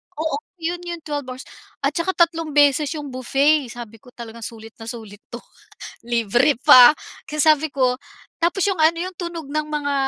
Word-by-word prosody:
oo, 315 -2 -2 0.3
'yon 345 +2 -2
'yong 340 -2 -6
twelve 290 -3 -5
hours. 255 +1 -8 0.4
At 275 - +2
tsaka 335 +5 -2
tatlong 330 -3 0
beses 290 0 +4
'yong 290 -3 -7
buffet. 275 +3 +1
Sabi 230 -2 -10
ko, 250 +3 -20
"Talagang 230 -1 -10
sulit 225 -1 -12
na 225 - -10
sulit 220 -4 -9
'to, 240 0 -10 0.6
libre 240 +3 +2
pa." 255 -2 +9 0.3
Kaya 305 0 -4
sabi 310 0 +3
ko 255 -2 +1 0.4
tapos 345 +3 -1
'yong 390 - -1
ano 325 +1 +2
'yong 365 +1 -5
tunog 340 -4 -6
ng 305 +1 -2
mga 295 -1 -3
290 Hz, 180 wpm, -21 LUFS, 245-315 Hz, 0.6 s, pa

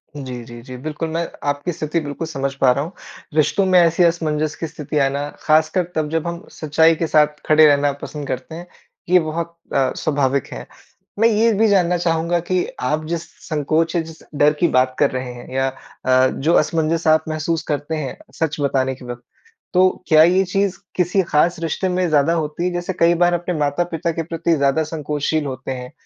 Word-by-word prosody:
जी, 130 -4 -6
जी, 120 0 -11
जी। 130 +1 -10
बिल्कुल, 155 +4 -4
मैं 165 +1 -2 0.2
आपकी 145 +5 -2
स्थिति 160 0 -2
बिल्कुल 150 +2 -5
समझ 140 -3 -3
पा 130 - +6
रहा 140 +3 0
हूँ। 165 - -7 0.4
रिश्तों 155 +5 +2
में 185 -1 +5
ऐसी 170 +1 +4
असमंजस 155 -3 0
की 165 - -4
स्थिति 150 -1 -5
आना, 140 +1 0
ख़ासकर 155 +4 +3
तब 155 -1 -1
जब 165 +1 -1
हम 170 +3 -5
सच्चाई 160 +2 +3
के 165 +1 -2
साथ 150 -1 +2
खड़े 155 0 +6
रहना 145 -1 +4
पसंद 145 -2 -6
करते 160 +6 -5
हैं, 175 +1 -9 0.4
ये 180 0 +6
बहुत 170 +1 -4 0.2
अ, 135 -2 +2
स्वाभाविक 140 -3 0
है। - - -7 0.5
मैं 225 - +6
ये 225 +1 +3
भी 220 +2 +3
जानना 180 -3 +3
चाहूँगा 170 0 0
कि 180 +1 -1 0.2
आप 150 +5 -1
जिस 170 0 -2 0.2
संकोच 160 +2 0
है 170 - +2
जिस 160 0 -12
डर 145 +1 +4
की 175 - +4
बात 130 -2 +2
कर 145 - +3
रहे 130 -1 -4
हैं 120 0 -11
या 135 0 +1 0.4
अ, 130 0 +4
जो 160 +5 0
असमंजस 165 +1 -1
आप 155 0 +4
महसूस 155 +1 -2
करते 145 +2 -2
हैं, 145 -5 -4 0.2
सच 160 -2 -2
बताने 130 -1 0
के 125 -1 -13
वक़्त, 120 0 -7 0.5
तो 185 +1 +5 0.2
क्या 155 0 +7
ये 185 +3 +4
चीज़ 195 0 0 0.2
किसी 180 +2 +2
ख़ास 170 +1 +1
रिश्ते 165 +3 -2
में 180 0 0
ज़्यादा 150 +1 +3
होती 160 +1 -2
है 180 - 0
जैसे 175 +1 -3
कई 170 +1 +5
बार 175 +1 +3
अपने 175 +1 -1
माता-पिता 165 +3 -1
के 165 0 -3
प्रति 165 0 0
ज़्यादा 140 +2 +2
संकोचशील 150 0 -2
होते 130 -1 -5
हैं, 125 -1 -6
155 Hz, 200 wpm, -20 LUFS, 145-170 Hz, 0.5 s, क्या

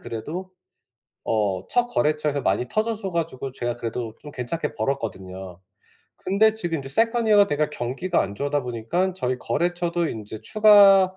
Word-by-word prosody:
그래도 150 +11 -6 0.7
어 100 -4 0
첫 245 0 +2
거래처에서 150 - 0
많이 125 - +1
터져 220 - 0
줘 200 -3 -5
가지고 160 -6 -3
제가 120 -2 -3
그래도 115 -1 -4
좀 150 - -10
괜찮게 145 +4 -4
벌었거든요. 95 -7 -4 0.6
근데 205 +4 +3
지금 175 -7 -2
이제 135 - -10
second 225 - +2
year가 205 -1 +7
돼가 150 -1 0
경기가 150 +8 -1
안 100 - -5
좋으다 145 +4 -1
보니깐 125 +11 -1
저희 130 -7 -2
거래처도 175 +2 -1
인제 110 0 -6
추가 200 -3 +6
150 Hz, 380 characters per minute, -24 LUFS, 120-185 Hz, 0.7 s, year가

